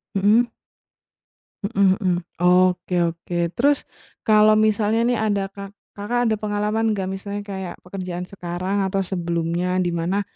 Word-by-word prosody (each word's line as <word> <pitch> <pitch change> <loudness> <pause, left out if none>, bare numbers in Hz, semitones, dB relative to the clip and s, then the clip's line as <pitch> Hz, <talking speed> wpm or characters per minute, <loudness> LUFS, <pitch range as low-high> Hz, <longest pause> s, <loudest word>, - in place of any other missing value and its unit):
Mhm? 210 +5 +4 1.2
Mhm 200 -3 +3
mhm, 185 -4 +1 0.3
oke, 180 +1 +3 0.2
oke. 170 +1 -9 0.2
Terus 285 +3 +4 0.5
kalau 215 0 +6
misalnya 215 +1 +2
nih, 245 - +1
ada 205 -2 +1
Ka 200 0 -9 0.3
Kakak 240 +4 0
ada 220 - +2
pengalaman 210 +1 0
nggak? 190 -2 -2
Misalnya 200 +1 -5
kayak 190 -3 -6
pekerjaan 180 -1 -6
sekarang, 190 +1 -2
atau 195 +1 0
sebelumnya 175 0 -1
dimana, 175 +2 0
195 Hz, 125 wpm, -22 LUFS, 180-210 Hz, 1.2 s, kalau